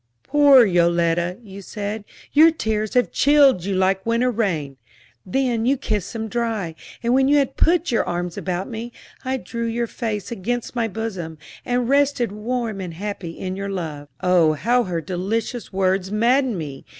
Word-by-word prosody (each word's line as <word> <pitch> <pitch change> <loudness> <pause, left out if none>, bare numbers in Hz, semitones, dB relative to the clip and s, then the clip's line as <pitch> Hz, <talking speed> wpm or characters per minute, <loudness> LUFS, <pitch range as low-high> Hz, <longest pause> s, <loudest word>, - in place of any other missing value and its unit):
'Poor 285 -4 +6
Yoletta,' 170 -1 +2
you 200 -2 -10
said, 205 +2 -5 0.3
'your 315 +3 +8
tears 220 -9 -2
have 250 - +3
chilled 280 - +4
you 195 0 -2
like 190 +1 +1
winter 235 +3 +1
rain.' 165 - -2 0.5
Then 240 +1 0
you 275 +2 +3
kissed 210 -7 -3
them 220 -1 -4
dry, 220 -7 -2 0.3
and 235 +1 +2
when 265 +1 +4
you 290 +1 +4
had 275 -2 +1
put 345 -1 +2
your 230 - +2
arms 175 0 -3
about 180 0 -3
me, 230 +1 -6 0.3
I 260 0 -1
drew 235 -2 -4
your 235 +1 -1
face 220 -3 -4
against 240 +4 -3
my 230 -2 +1
bosom, 190 -7 -5 0.3
and 245 -1 0
rested 275 -4 +2
warm 220 -1 -3
and 175 -3 -6
happy 190 -3 -6
in 185 0 -4
your 200 +1 -4
love." 160 -6 -5
Oh, 180 -4 +4
how 240 +10 +1
her 175 -3 -2
delicious 195 +8 -3
words 190 0 0
maddened 240 +2 +2
me! 145 -5 -6
215 Hz, 170 wpm, -22 LUFS, 185-245 Hz, 0.5 s, your